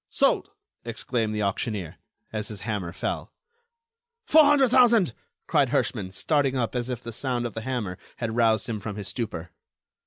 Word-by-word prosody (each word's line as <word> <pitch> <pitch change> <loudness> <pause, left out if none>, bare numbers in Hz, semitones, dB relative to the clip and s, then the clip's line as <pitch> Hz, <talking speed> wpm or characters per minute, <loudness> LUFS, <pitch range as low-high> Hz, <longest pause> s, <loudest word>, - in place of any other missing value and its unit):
Sold!" - - +2 0.3
exclaimed 110 -3 -2
the 105 - 0
auctioneer, 100 -2 -2 0.4
as 110 -1 -2
his 105 -3 -6
hammer 105 -6 -3
fell. - - -3 0.9
"Four 315 -7 +7
hundred 285 -3 +5
thousand," 235 - +5 0.3
cried - - +3
Herschman, 95 - 0
starting 140 - +1
up, 115 -3 -1
as 125 0 -2
if 125 -3 -4
the 115 - -6
sound 125 0 -1
of 120 - -4
the 110 - -4
hammer 110 -7 -3 0.2
had 115 -2 -3
roused 115 -2 +3
him 110 -3 -3
from 105 0 -5
his 100 -2 -4
stupor. 100 -6 -4
115 Hz, 165 wpm, -26 LUFS, 105-130 Hz, 0.9 s, Four